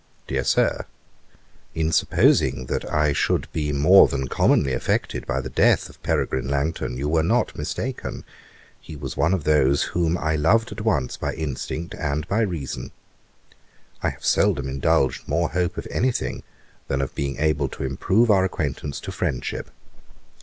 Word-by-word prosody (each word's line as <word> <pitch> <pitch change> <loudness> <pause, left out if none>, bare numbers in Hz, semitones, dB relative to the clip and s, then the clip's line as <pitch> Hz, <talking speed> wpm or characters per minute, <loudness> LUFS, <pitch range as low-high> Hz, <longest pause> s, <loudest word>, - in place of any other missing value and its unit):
'DEAR - - -1
SIR, - - +1 0.9
'In 80 0 0
supposing 65 -4 +3
that - - -3
I 75 -1 +2
should - - 0
be 75 -2 -1
more 75 +7 +7
than 65 -1 -3
commonly 65 +1 +2
affected - - -1
by 65 - -1
the 65 - -6
death - - +3
of - - -17
Peregrine 65 0 -1
Langton, 70 -2 -2
you 70 +3 -2
were 80 +1 +2
not 115 +10 +1
mistaken; 110 - -4 0.6
he 80 - -10
was 70 -2 -6
one 80 - +2
of 95 -5 0
those 70 -2 +3
whom 85 0 +1
I 80 -2 0
loved 110 +10 +2
at 105 +1 -6
once 75 - 0
by - - -3
instinct 80 +2 -4
and 75 +1 -2
by 100 +4 +1
reason. 75 - -3 1.1
I - - +1
have - - -10
seldom 70 -2 +2
indulged 65 0 +1
more 80 +3 +1
hope 90 +1 -1
of - - -5
any 130 +2 +2
thing - - -3 0.5
than 70 - -1
of 70 - -2
being 70 -1 -3
able 75 -2 +1
to - - -7
improve 95 - +2
our 95 -2 +4
acquaintance 75 -5 -3
to - - -6
friendship. 65 -2 -3
75 Hz, 165 wpm, -23 LUFS, 70-85 Hz, 1.1 s, more